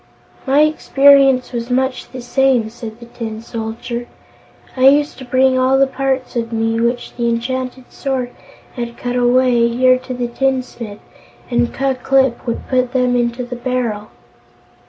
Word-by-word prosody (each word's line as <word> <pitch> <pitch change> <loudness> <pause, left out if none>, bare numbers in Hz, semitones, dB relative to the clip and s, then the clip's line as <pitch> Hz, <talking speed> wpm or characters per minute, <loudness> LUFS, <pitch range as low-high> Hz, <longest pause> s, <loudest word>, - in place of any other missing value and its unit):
"My 275 +3 +4
experience 275 -3 +4
was 235 0 -4
much 260 +1 -1
the 255 - -8
same," 245 -3 +1
said 230 -1 -9
the 235 - -11
Tin 225 -2 -6
Soldier. 230 +1 -5 0.7
"I 260 0 +5
used 290 +1 +3
to 260 - -8
bring 255 +1 +3
all 260 +1 +3
the 275 - +5
parts 270 -1 -2
of 230 -1 -2
me, 225 0 0
which 240 +1 -2
the 235 -1 0
enchanted 255 +2 -3
sword 260 -3 -3 0.4
had 235 -2 -6
cut 245 0 -3
away, 245 -1 +3
here 255 +2 +3
to 255 0 -7
the 245 -1 -2
tinsmith, 245 -4 -3 0.5
and 240 0 +1
Ku 270 0 0
Klip 265 -1 +1
would 235 - -3
put 255 -1 0
them 250 -1 +2
into 240 +1 0
the 245 0 -6
barrel." 240 -4 -2
250 Hz, 155 wpm, -17 LUFS, 235-265 Hz, 0.7 s, I